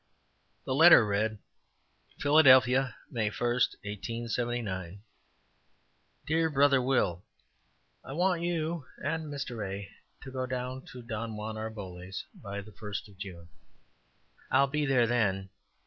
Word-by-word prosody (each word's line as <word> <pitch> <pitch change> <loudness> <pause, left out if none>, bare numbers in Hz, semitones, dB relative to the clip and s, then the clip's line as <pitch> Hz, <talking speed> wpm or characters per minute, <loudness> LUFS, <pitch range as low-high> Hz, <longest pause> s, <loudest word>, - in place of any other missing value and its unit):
The 130 - -1
letter 160 -4 +8
read: 105 +2 0 0.8
"Philadelphia, 135 -3 +5 0.2
May 110 -3 0
1, - - -10
1879. 115 -4 -2 1.2
"DEAR 160 +1 +2
BROTHER 140 -2 +4
WILL: 120 -9 +1 0.8
I - - -9
want 175 +2 +1
you 165 -4 -2 0.2
and 160 +2 -1
Mr. 130 -6 -4
A. 100 -1 -6 0.3
to 135 - -8
go 130 -1 -3
down 130 +1 -4
to 125 -1 -9
Don 115 -1 -4
Juan 110 +1 -5
Arboles's 95 -4 -6
by 100 -1 -6
the 110 +2 -13
first 105 +2 -6
of 95 -2 -19
June. 90 -4 -8 1.0
I 130 - +4
will 140 - +4
be 150 +1 0
there 130 -3 +4
then. 95 -5 0
120 Hz, 125 wpm, -30 LUFS, 105-135 Hz, 1.2 s, letter